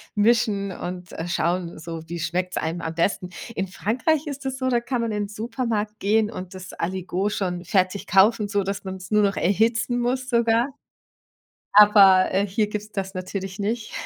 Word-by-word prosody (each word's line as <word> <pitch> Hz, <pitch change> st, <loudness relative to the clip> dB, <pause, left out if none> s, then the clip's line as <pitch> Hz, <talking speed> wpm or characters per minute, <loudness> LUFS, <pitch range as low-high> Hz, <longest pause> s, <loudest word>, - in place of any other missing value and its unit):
mischen 210 Hz, -2 st, +2 dB
und, 180 Hz, -1 st, -6 dB
äh, 165 Hz, -, -5 dB
schauen 175 Hz, +1 st, -1 dB
so, 165 Hz, 0 st, -6 dB
wie 170 Hz, +1 st, -5 dB
schmeckt's 180 Hz, +3 st, -2 dB
einem 165 Hz, +2 st, -2 dB
am 160 Hz, 0 st, -4 dB
besten? 180 Hz, +2 st, 0 dB, 0.3 s
In 190 Hz, -, -1 dB
Frankreich 255 Hz, -, 0 dB
ist 285 Hz, -2 st, -6 dB
das 265 Hz, 0 st, -2 dB
so, 260 Hz, -1 st, -2 dB
da 245 Hz, -2 st, +2 dB
kann 240 Hz, +1 st, -2 dB
man 230 Hz, -1 st, -1 dB
in 210 Hz, -1 st, -1 dB
'n -, -, -8 dB
Supermarkt 220 Hz, -1 st, -3 dB
gehen 215 Hz, +2 st, +2 dB
und 185 Hz, -3 st, -8 dB
das 185 Hz, -1 st, -9 dB
Aligot 185 Hz, +3 st, -2 dB
schon 180 Hz, -3 st, -3 dB
fertig 190 Hz, -1 st, 0 dB
kaufen, 205 Hz, +3 st, +4 dB
sodass 200 Hz, -1 st, -2 dB
man's 190 Hz, -1 st, -7 dB
nur 210 Hz, 0 st, +4 dB
noch 200 Hz, -1 st, +2 dB
erhitzen 225 Hz, +5 st, +1 dB
muss 255 Hz, +2 st, -1 dB
sogar. 235 Hz, 0 st, +2 dB, 1.0 s
Aber, 200 Hz, -3 st, +7 dB
äh, 195 Hz, +2 st, +2 dB
hier 210 Hz, +2 st, 0 dB
gibt's 210 Hz, 0 st, -6 dB
das 195 Hz, 0 st, -4 dB
natürlich 190 Hz, +1 st, -5 dB
nicht. 215 Hz, +2 st, -3 dB
200 Hz, 180 wpm, -24 LUFS, 185-225 Hz, 1.0 s, Aber